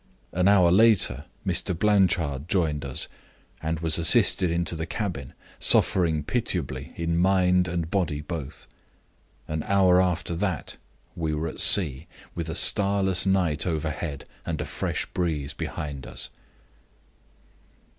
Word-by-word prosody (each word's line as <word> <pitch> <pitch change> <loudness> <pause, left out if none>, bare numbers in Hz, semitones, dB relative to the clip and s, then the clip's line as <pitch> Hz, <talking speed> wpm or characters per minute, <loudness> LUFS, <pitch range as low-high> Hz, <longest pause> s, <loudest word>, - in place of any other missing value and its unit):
An 90 +3 0
hour 95 -4 +4
later 95 - +3 0.2
Mr. 90 - 0
Blanchard 90 -8 +1
joined 80 -6 0
us, 70 -2 -1 0.5
and 80 0 -3
was 80 -1 +3
assisted 85 +2 +5
into 85 0 -1
the 80 +1 -5
cabin, 90 - -5 0.3
suffering 80 -5 +3
pitiably 75 - -2
in 85 0 -2
mind 90 -1 +2
and 85 -2 -4
body 85 -7 -1
both. 75 -2 -7 0.8
An 80 0 -3
hour 95 0 +3
after 90 -2 -2
that 90 -4 -3 0.4
we 80 -2 -3
were 80 +2 -3
at - - -6
sea, 80 -6 +5 0.3
with 85 -1 -5
a 80 - -4
starless 95 -2 +2
night 90 -6 +1
overhead, 80 -2 -4 0.2
and - - -4
a - - -3
fresh - - -3
breeze 80 -6 -3
behind 70 -4 -6
us. - - -5
85 Hz, 130 wpm, -25 LUFS, 75-90 Hz, 0.8 s, assisted